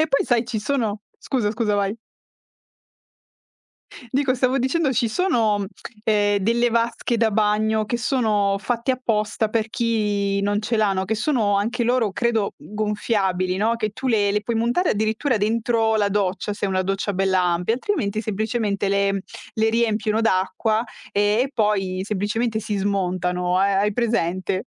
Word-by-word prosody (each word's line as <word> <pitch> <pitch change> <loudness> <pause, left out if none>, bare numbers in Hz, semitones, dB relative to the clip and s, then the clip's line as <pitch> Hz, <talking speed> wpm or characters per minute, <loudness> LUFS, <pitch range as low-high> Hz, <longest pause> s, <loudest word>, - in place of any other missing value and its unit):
E 315 - +3
poi 275 - +2
sai 240 -1 +2
ci 225 -3 -2
sono 220 -3 -1 0.2
scusa, 240 -7 -1
scusa 215 -1 0
vai. 200 +2 0 2.1
Dico, 265 -1 +1
stavo 255 +1 +1
dicendo 270 +3 +1
ci 240 0 +1
sono, 220 - +1 0.4
ehm, 205 -2 +2
delle 235 +4 +1
vasche 235 +1 0
da 225 -1 +3
bagno 215 +1 +1
che 235 +2 -2
sono 215 -6 +1
fatte 235 +4 -1
apposta 220 -3 -1
per 225 0 -1
chi 210 -4 0
non 205 +1 0
ce 230 +2 -1
l'ha, 205 -2 +3
no, 190 0 -1
che 220 - -1
sono 215 -4 +1
anche 235 +4 -1
loro 240 -3 +2
credo 225 -1 0
gonfiabili 205 -3 -1
no, 225 +3 +1
che 215 -2 -2
tu 260 +5 -4
le 205 -3 +2
le 210 - +1
puoi 230 +2 -2
montare 240 +11 +1
addirittura 220 +5 0
dentro 225 +1 +1
la 205 -1 +2
doccia, 200 0 -1
se - - -4
è 200 - +1
una 185 0 0
doccia 195 +2 -2
bella 190 -1 +1
ampia. 180 +5 +1
Altrimenti 220 - -1
semplicemente 215 -1 -1
le 200 -1 +1 0.3
le 220 0 +2
riempiono 220 -1 +1
d'acqua 215 +2 +1 0.3
e 205 - 0 0.2
e 270 - -3
poi 200 -6 0
semplicemente 220 +2 -1
si 210 0 -3
smontano. 180 -2 0
Ha 195 0 +2
hai 210 0 +1
presente? 190 -5 -1
215 Hz, 160 wpm, -22 LUFS, 200-235 Hz, 2.1 s, E